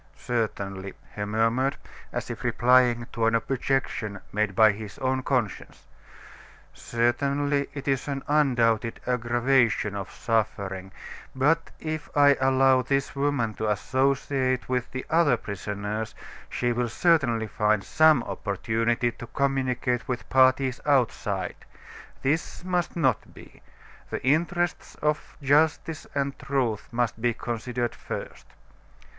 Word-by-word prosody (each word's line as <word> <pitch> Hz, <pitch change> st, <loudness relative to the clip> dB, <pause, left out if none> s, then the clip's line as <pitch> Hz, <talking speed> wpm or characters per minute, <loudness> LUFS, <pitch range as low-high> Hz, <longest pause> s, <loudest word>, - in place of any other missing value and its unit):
"Certainly," 100 Hz, -5 st, -3 dB, 0.2 s
he 105 Hz, -, -2 dB
murmured, 115 Hz, +6 st, +1 dB, 0.3 s
as -, -, -4 dB
if -, -, -7 dB
replying 120 Hz, -1 st, +3 dB
to 115 Hz, -1 st, +1 dB
an 115 Hz, -, +3 dB
objection 125 Hz, -4 st, -1 dB
made 105 Hz, -2 st, 0 dB
by 110 Hz, 0 st, +7 dB
his 105 Hz, -1 st, -8 dB
own 130 Hz, 0 st, 0 dB
conscience; 125 Hz, -8 st, -2 dB, 0.9 s
"certainly, 140 Hz, +4 st, 0 dB
it 140 Hz, -1 st, -6 dB
is 135 Hz, 0 st, 0 dB
an 140 Hz, -1 st, -3 dB
undoubted 120 Hz, -6 st, +2 dB
aggravation 120 Hz, -3 st, +2 dB
of 100 Hz, -2 st, -5 dB
suffering; 100 Hz, -4 st, -2 dB, 0.4 s
but 160 Hz, +5 st, +2 dB
if 155 Hz, -1 st, -4 dB
I 145 Hz, -1 st, +7 dB
allow 130 Hz, 0 st, +4 dB
this 135 Hz, +2 st, -1 dB
woman 140 Hz, -5 st, 0 dB
to 110 Hz, +1 st, -2 dB
associate 130 Hz, +3 st, 0 dB
with 125 Hz, -1 st, -1 dB
the 130 Hz, -, -5 dB
other 155 Hz, -6 st, +3 dB
prisoners, 105 Hz, +1 st, -4 dB, 0.3 s
she 120 Hz, 0 st, 0 dB
will 120 Hz, 0 st, -1 dB
certainly 125 Hz, -6 st, +2 dB
find 105 Hz, -1 st, +1 dB
some 155 Hz, -2 st, +4 dB
opportunity 115 Hz, +4 st, -1 dB
to 120 Hz, -, -10 dB
communicate 130 Hz, -3 st, 0 dB
with 125 Hz, -2 st, -3 dB
parties 130 Hz, 0 st, +4 dB
outside. 115 Hz, -9 st, 0 dB, 0.7 s
This 155 Hz, +5 st, -1 dB
must 180 Hz, -1 st, -1 dB
not 130 Hz, -10 st, 0 dB
be; -, -, -15 dB, 0.5 s
the -, -, -4 dB
interests 170 Hz, +5 st, 0 dB
of 150 Hz, 0 st, -2 dB
justice 155 Hz, +3 st, +2 dB
and 140 Hz, -1 st, -1 dB
truth 125 Hz, -6 st, -1 dB
must 120 Hz, -1 st, -1 dB
be 120 Hz, -1 st, +1 dB
considered 120 Hz, 0 st, -3 dB
first." -, -, -7 dB
125 Hz, 120 wpm, -26 LUFS, 115-140 Hz, 0.9 s, by